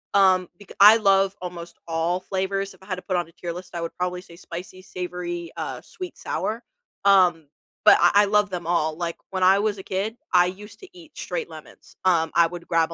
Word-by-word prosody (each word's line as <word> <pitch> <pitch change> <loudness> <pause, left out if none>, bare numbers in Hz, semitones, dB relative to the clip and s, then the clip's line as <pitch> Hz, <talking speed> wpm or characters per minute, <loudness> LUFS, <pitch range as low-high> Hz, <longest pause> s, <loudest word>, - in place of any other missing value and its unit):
um, 185 -2 +4
becau 205 - -13
I 210 +3 +9
love 195 -2 +3
almost 175 -1 -8
all 165 +2 0
flavors, 195 +1 -2
if - - -22
I 190 - -16
had 185 - -2
to 185 - -9
put 185 0 -1
on 175 - -2
a - - -18
tier 170 0 -6
list, 180 +1 -10
I 170 - -3
would 165 - -4
probably 180 0 -3
say 170 - -15
spicy, 180 +2 -9
savory, 175 -2 -6
uh, - - -5
sweet, 365 -1 -9
sour? 225 +3 -3 0.4
Um, 180 -6 +4 0.4
but - - +8
I 175 - +5
I - - +2
love 210 0 +2
them 175 -2 -5
all, 160 -2 +1
like, 170 0 -4
when 190 -1 -3
I 190 +1 +6
was 210 0 0
a - - -8
kid, 195 +5 -3 0.2
I 180 -1 +6
used 205 +4 -8
to 385 - -12
eat 325 -4 -16
straight 485 -2 -4
lemons, - - -14
um, 165 -3 +3
I 170 -1 +5
would 175 0 -9
grab 165 0 +1
180 Hz, 225 wpm, -24 LUFS, 170-195 Hz, 0.4 s, I